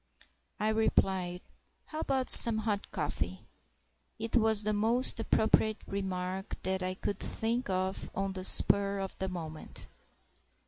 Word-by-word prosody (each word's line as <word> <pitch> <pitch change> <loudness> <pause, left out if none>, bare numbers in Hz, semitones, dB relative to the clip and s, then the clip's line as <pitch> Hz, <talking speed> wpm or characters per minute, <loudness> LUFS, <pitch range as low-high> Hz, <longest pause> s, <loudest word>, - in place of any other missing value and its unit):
I 215 +1 -1
replied, 190 -5 -1 0.4
"How 310 - -9
about 265 -4 -2
some 230 -2 +10
hot 210 -2 -4
coffee?" - - -5 0.7
It 225 +1 -6
was 220 -2 +3
the 215 +1 -2
most 230 +4 +2
appropriate 220 -1 0
remark 190 -1 -6
that 190 0 -3
I 185 0 -4
could 200 +1 -5
think 230 +1 -4
of 190 +1 -4
on 195 0 -4
the 185 -1 -7
spur 200 +1 +5
of 195 -1 -7
the 190 - -3
moment. 160 -4 -9
200 Hz, 135 wpm, -29 LUFS, 190-220 Hz, 0.7 s, some